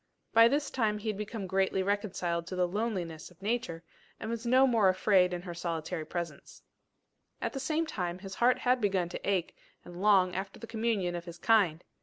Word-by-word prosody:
By 230 0 +8
this 285 +4 0
time 220 -4 +1
he 215 +1 -4
had 210 - -2
become 210 -1 -4
greatly 190 0 +1
reconciled 185 -4 -1
to 185 - -5
the 180 -1 +2
loneliness 180 -5 -3
of 180 -1 -22
Nature, 200 -6 -2 0.4
and 230 +1 -4
no 260 +2 +6
more 230 -6 +4
was 185 - +3
afraid 185 -2 +4
in 175 0 -4
her 175 -2 -6
solitary 165 -1 -3
presence. 170 -4 -6 0.8
At - - -3
the 270 - -3
same 310 +5 0
time 180 - -3
his 195 0 -8
heart 245 +5 +3
had 250 0 +1
begun 190 -4 +1
to - - -4
ache 185 -4 0 0.3
and 175 +1 -9
long 195 -3 +4
after 195 +1 -4
the - - -7
communion 220 -5 -1
of 170 0 -5
his 170 -1 -9
kind. 180 -5 +3
195 Hz, 200 wpm, -30 LUFS, 175-225 Hz, 0.8 s, By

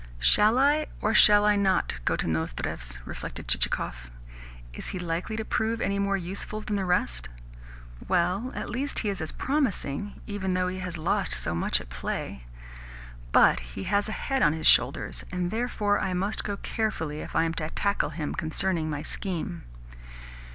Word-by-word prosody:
"Shall 210 - +5
I, 290 +3 +3
or 215 - +1
shall 210 0 +8
I 210 0 +5
not, 195 -2 +2
go - - +2
to - - -2
Nozdrev's?" 70 -6 -3
reflected - - -7
Chichikov. - - -1 0.6
"Is - - -7
he 190 - -3
likely 175 +4 -3
to 220 - -3
prove 225 +2 0
any 200 0 0
more 200 0 +1
useful 195 +4 -5
than 215 -1 -3
the 195 -1 -1
rest? 60 - 0 0.8
Well, 185 +8 +1
at - - -4
least 275 +4 -3
he - - +2
is 195 -4 -3
as 160 - -3
promising, 205 - -1
even 190 -3 -2
though 180 0 +1
he 185 +1 -5
has 180 -2 -4
lost 155 - 0
so - - +1
much 85 - +2
at - - -11
play. 60 0 -5 0.9
But - - +6 0.2
he 95 - -3
has 205 - +1
a 220 - -3
head 270 -1 -1
on 150 - +5
his 160 -1 -4
shoulders, - - +3
and 180 -1 -1
therefore 220 -3 0
I 190 -1 -1
must 195 +4 -1
go 205 -1 -3
carefully 160 -11 -2
if - - -8
I - - +4
am 165 0 0
to 155 -1 -3
tackle 200 +4 0
him 150 -3 -4
concerning 165 -1 -1
my 150 -1 -3
scheme." 170 - -4
185 Hz, 180 wpm, -27 LUFS, 155-210 Hz, 0.9 s, shall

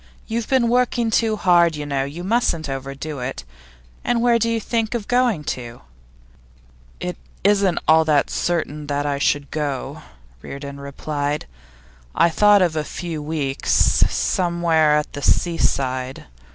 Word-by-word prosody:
You've 230 0 -3
been 260 -3 +3
working 240 -1 +1
too 220 -1 +2
hard, 175 -4 +4
you 150 0 -5
know. 140 -2 -1
You 155 +6 -7
mustn't 190 -7 0
overdo 135 +2 -5
it. 125 +2 -5 0.6
And 240 -1 +1
where 235 0 +3
do 230 +1 +1
you 230 0 0
think 225 +1 -1
of 220 -4 -4
going 245 -10 +2
to?' 120 -4 -6 1.2
'It 180 0 -4 0.3
isn't 195 -3 +3
at - - -3
all 160 0 +6 0.2
certain 150 -3 -2
that 145 0 -1
I 140 -1 -1
shall 145 0 +1
go,' 145 -4 -3 0.4
Reardon 140 - -8
replied. 145 +1 -3 0.7
'I 170 - +4
thought 205 +3 +5
of 170 -3 0
a 155 - 0
few 165 0 -5
weeks 145 -3 -2 0.4
somewhere 170 -4 +2
at 150 - -3
the 145 - -6
seaside. 130 -5 0
160 Hz, 145 wpm, -21 LUFS, 145-210 Hz, 1.2 s, all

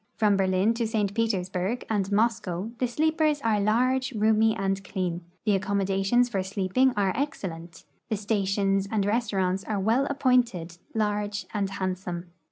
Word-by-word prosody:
From 210 -2 +3
Berlin 190 +3 +2
to 230 -1 -1
St. 210 -3 0
Petersburg 200 0 -1
and 205 -3 0
INIoscow 210 -1 0
the 250 - +1
sleei)ers 310 +3 +1
are 215 -2 +2
large, 255 +5 +2
roonyv, 220 +1 +3
and 195 0 -1
clean; 180 -3 -3 0.2
the 210 -2 +3
accommodations 195 +4 +1
for 200 -6 -1
sleeping 195 +7 +1
are 195 -2 +2
excellent; 175 - -5 0.3
the 215 - 0
stations 195 -1 0
and 210 -3 +1
restaurants 195 -4 0
are 210 -2 -2
well 230 +8 +2
appointed, 240 -11 +1 0.2
large, 210 -1 -1
and 200 -2 -1
handsome. 185 -2 -4
205 Hz, 145 wpm, -26 LUFS, 190-230 Hz, 0.3 s, From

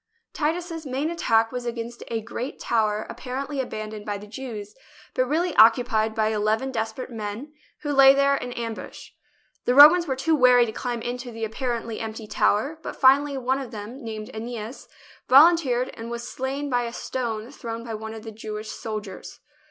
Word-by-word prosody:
Titus's 330 +1 -2
main 280 +3 -2
attack 225 -9 +2
was 250 -1 -4
against 235 0 -5
a 225 -1 -2
great 240 +4 -6
tower 215 -2 0
ap - - -9
parently 270 +2 -3
abandoned 215 -3 -6
by 205 -1 -3
the 205 - -10
Jews, 215 -3 -7 0.4
but 255 - +1
really 330 +5 0
oc 225 +1 +9
cupied 220 -3 -1
by 220 -1 +2
eleven 220 +4 0
desperate 225 +2 -4
men 225 +6 -6 0.3
who 295 - -1
lay 270 0 +8
there 280 0 +3
in 250 -2 -4
ambush. 230 -2 -7 0.5
The 245 - +2
Romans 320 +5 +9
were 265 - 0
too 315 +5 +1
wary 250 -3 +6
to 220 - -4
climb 240 0 -4
into 245 +1 -4
the 225 -1 -4
apparently 230 0 -3
empty 220 0 -6
tower, 270 +9 +1
but - - -6
finally 280 +1 +4
one 260 +1 0
of 265 -3 -6
them, 220 +6 -8
named 220 +1 -6
iEneas, 230 +2 -6 0.4
volunteered, 270 -3 +5
and 230 +1 -8
was 235 0 -5
slain 270 +2 -3
by 245 -3 0
a 235 - -6
stone 235 -2 -4
thrown 230 -4 -6
by 230 -1 -6
one 220 +1 -6
of 220 - -9
the 225 - -7
Jewish 215 0 -6
soldiers. 215 -4 -7
240 Hz, 185 wpm, -25 LUFS, 220-270 Hz, 0.5 s, oc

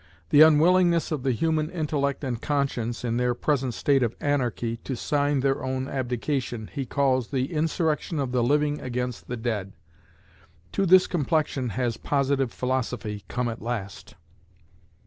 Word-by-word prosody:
The 145 - +7
unwillingness 170 +2 +5
of 150 -4 -1
the 130 0 +1
human 155 +4 0
intellect 150 -5 -1
and 125 -3 -3
conscience, 125 -5 -1
in 115 0 0
their 125 0 +1
present 130 -2 0
state 140 -2 +2
of 120 -2 0
"anarchy," 120 -5 -1
to 130 +3 -5
sign 145 +2 0
their 135 -1 0
own 130 0 -2
abdication, 125 -3 -3
lie 140 -2 -2
calls 130 -2 +1
"the 130 +4 -2
insurrection 160 0 0
of 135 -3 -1
the 125 -1 +1
living 145 +4 +1
against 125 -1 -4
the 125 - -4
dead." 110 -4 -3 1.0
To 195 - 0
this 185 +1 +7
complexion 150 -5 0
has 120 +1 -2
Positive 140 -2 0
Philosophy 120 -5 -3
come 125 0 -2
at 115 -1 -5
last! 105 -4 -5
130 Hz, 150 wpm, -26 LUFS, 120-150 Hz, 1.0 s, The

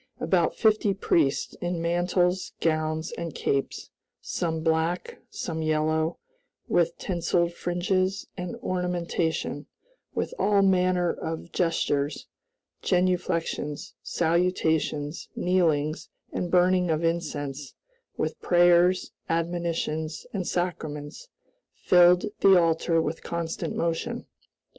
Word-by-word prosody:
About - - +1
fifty 215 -3 +2
priests, 155 -7 +1
in 175 -1 -2
mantles, 175 +2 +1
gowns, 155 -1 0
and 165 -3 -5
capes, 140 0 -2 0.3
some 160 -2 -2
black, 160 +2 0
some 160 -2 -4
yellow, 155 +1 +1 0.5
with 170 -1 +2
tinseled 170 -1 0
fringes 185 +2 -1
and 180 +2 -5
ornamentation, 175 -4 -2 0.5
with - - -2
all 200 -1 +3
manner 180 -2 +3
of 160 +1 -6
gestures, 150 -4 0 0.6
genuflections, 175 -5 -1
salutations, 160 -3 0
kneelings, 160 -4 +1 0.2
and 180 - -2
burning 180 0 +3
of 160 +1 0
incense; 145 -4 -3 0.4
with - - -2
prayers, 175 +1 +4 0.2
admonitions, 165 -2 -2
and 190 -4 -2
sacraments, 155 - -3 0.5
filled 180 0 +5
the 190 -2 +7
altar 165 0 +2
with 160 0 -2
constant 170 -1 -3
motion. 170 +9 -2
170 Hz, 95 wpm, -26 LUFS, 160-180 Hz, 0.6 s, the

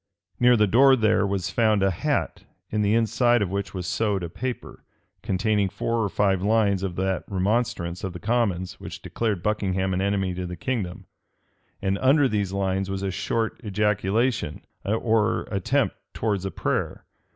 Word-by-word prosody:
Near 125 0 +5
the 105 - +5
door 130 +6 +6
there 110 -3 +2
was 100 -2 -2
found 110 -4 +2
a 95 - +3
hat, 85 - -1 0.3
in 105 - 0
the 105 +1 +2
inside 115 +1 +3
of 95 - -4
which 100 0 -3
was 90 -1 -4
sewed 100 0 0
a 85 - -4
paper, 125 +8 -6 0.4
containing 100 +1 +1
four 115 +4 -1
or 105 - 0
five 95 -2 +1
lines 100 -2 +2
of 95 -3 -3
that 95 0 -1
remonstrance 95 -3 -1
of 95 - -2
the 90 - -7
commons 100 -5 -1
which - - -8
declared 105 -7 -2
Buckingham 95 -3 0
an 95 - 0
enemy 95 -2 0
to 90 0 -4
the 90 - -6
kingdom; 95 -3 -3 0.8
and 95 0 0
under 135 +2 +4
these 100 -5 -1
lines 95 0 -1
was 95 0 -3
a 95 - -1
short 110 +4 -2
ejaculation, 105 - 0 0.2
or 110 +2 +1
attempt 95 -3 +1 0.2
towards 100 -4 -1
a - - -1
prayer. - - -2
100 Hz, 170 wpm, -25 LUFS, 95-110 Hz, 0.8 s, door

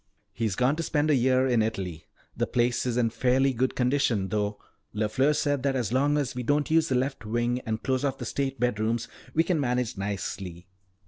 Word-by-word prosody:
"He's 110 -5 -1
gone 125 +6 +2
to - - -1
spend 155 -1 +1
a - - +5
year 130 +1 +3
in 120 -3 +3
Italy. 95 -7 -3 0.3
The - - 0
place 120 +1 +1
is 120 -1 -1
in 115 -2 +2
fairly 130 +3 +2
good 130 +2 0
condition 125 -6 +1
though. 105 0 -1 0.4
LeFleur 110 +8 +2
said 145 -2 0
that 135 0 0
as 120 -3 -1
long 145 +3 +3
as 140 -2 -1
we 125 - -4
don't 145 +4 0
use 160 0 +3
the 130 - +1
left 130 -1 -1
wing 120 +3 0
and 110 0 -2
close 130 0 0
off 135 -1 0
the - - -6
state 135 -2 -2
bedrooms, 115 0 0 0.3
we 165 - +4
can 170 -2 0
manage 125 -5 -1
nicely." 95 -2 -4
125 Hz, 205 wpm, -27 LUFS, 110-135 Hz, 0.4 s, a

